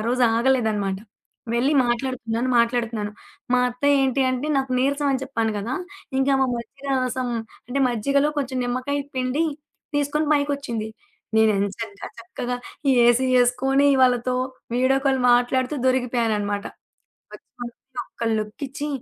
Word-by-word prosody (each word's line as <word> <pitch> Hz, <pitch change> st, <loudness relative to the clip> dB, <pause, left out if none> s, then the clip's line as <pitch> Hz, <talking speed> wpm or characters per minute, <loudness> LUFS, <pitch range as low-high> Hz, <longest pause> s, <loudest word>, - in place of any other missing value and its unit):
రోజు 250 Hz, +1 st, +1 dB
ఆగలేదనమాట. 220 Hz, -6 st, +1 dB, 0.6 s
వెళ్ళి 260 Hz, +5 st, +2 dB
మాట్లాడుతున్నాను, 240 Hz, -1 st, -1 dB
మాట్లాడుతున్నాను. 230 Hz, -3 st, 0 dB, 0.4 s
మా 250 Hz, -, +5 dB
అత్తయ్యేంటి 270 Hz, +1 st, +2 dB
అంటే 255 Hz, +3 st, -2 dB
నాకు 265 Hz, -1 st, -2 dB
నీరసం 280 Hz, +3 st, +1 dB
అని 265 Hz, -, -1 dB
చెప్పాను 230 Hz, -4 st, -1 dB
కదా! 225 Hz, +5 st, -4 dB, 0.5 s
ఇంకా 270 Hz, +1 st, +3 dB
మా 265 Hz, -, +4 dB
మజ్జిరాసం 255 Hz, 0 st, -2 dB, 0.4 s
అంటే 250 Hz, +3 st, -2 dB
మజ్జిగలో 275 Hz, +5 st, +1 dB
కొంచెం 265 Hz, -2 st, -2 dB
నిమ్మకాయ 255 Hz, +4 st, -1 dB, 0.2 s
పిండి, 255 Hz, +4 st, 0 dB, 0.5 s
తీసుకొని, 290 Hz, +2 st, 0 dB
పైకొచ్చింది. 280 Hz, -6 st, -1 dB, 0.5 s
నేను 220 Hz, 0 st, +5 dB
ఎంచక్క 200 Hz, +1 st, -4 dB, 0.2 s
చక్కగా 245 Hz, +1 st, -4 dB, 0.5 s
ఏసీ 240 Hz, +2 st, +4 dB
ఏసుకొని 270 Hz, +3 st, +3 dB, 0.2 s
వాళ్ళతో 250 Hz, 0 st, +3 dB, 0.4 s
వీడియో 260 Hz, +2 st, +3 dB
కాల్ 270 Hz, -1 st, +3 dB
మాట్లాడుతూ 250 Hz, +3 st, +2 dB
దొరికిపోయాననమాట. 225 Hz, -5 st, 0 dB, 0.7 s
ఒక్క -, -, -6 dB, 0.3 s
నిమిషం, 250 Hz, +1 st, -9 dB
ఒక్క 235 Hz, -, -7 dB
లుక్కిచ్చి 270 Hz, +7 st, -5 dB
255 Hz, 115 wpm, -23 LUFS, 235-270 Hz, 0.7 s, మా